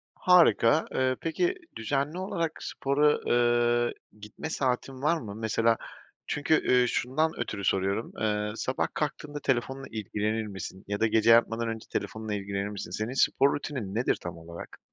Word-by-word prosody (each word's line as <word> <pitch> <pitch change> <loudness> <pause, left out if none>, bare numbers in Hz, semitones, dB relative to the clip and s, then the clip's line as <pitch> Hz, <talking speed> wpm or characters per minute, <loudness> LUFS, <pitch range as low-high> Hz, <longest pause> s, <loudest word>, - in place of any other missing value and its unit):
Harika. 165 -5 +5
Eee, 130 0 +1
peki 355 - 0 0.2
düzenli 140 +8 -1
olarak 170 -4 -2
spora, 145 +2 +2
eee, 120 0 +3 0.3
gitme 105 +9 -7
saatin 130 -1 -2
var 155 +3 +3
mı? 100 -4 -7
Mesela, 115 +1 +2 0.5
çünkü, 145 +2 +1 0.2
eee, 125 -1 +5
şundan 155 +8 0
ötürü 100 -2 -3
soruyorum, 95 +4 0
eee, 105 -1 0
sabah 130 +2 -1
kalktığında 145 0 -3
telefonunla 135 +2 -1
ilgilenir 110 +1 -2
misin? 95 -1 -7
Ya 100 0 -3
da 115 - +4
gece 110 +1 +3
yatmadan 115 0 +4
önce 110 -1 -5
telefonunla 110 -1 -3
ilgilenir 100 0 -3
misin? 100 -4 -6
Senin 110 +6 -3
spor 140 +1 +3
rutinin 130 -9 -4
nedir 120 +3 +1
tam 85 -1 -6
olarak? 85 +1 -10
120 Hz, 150 wpm, -28 LUFS, 105-140 Hz, 0.5 s, Harika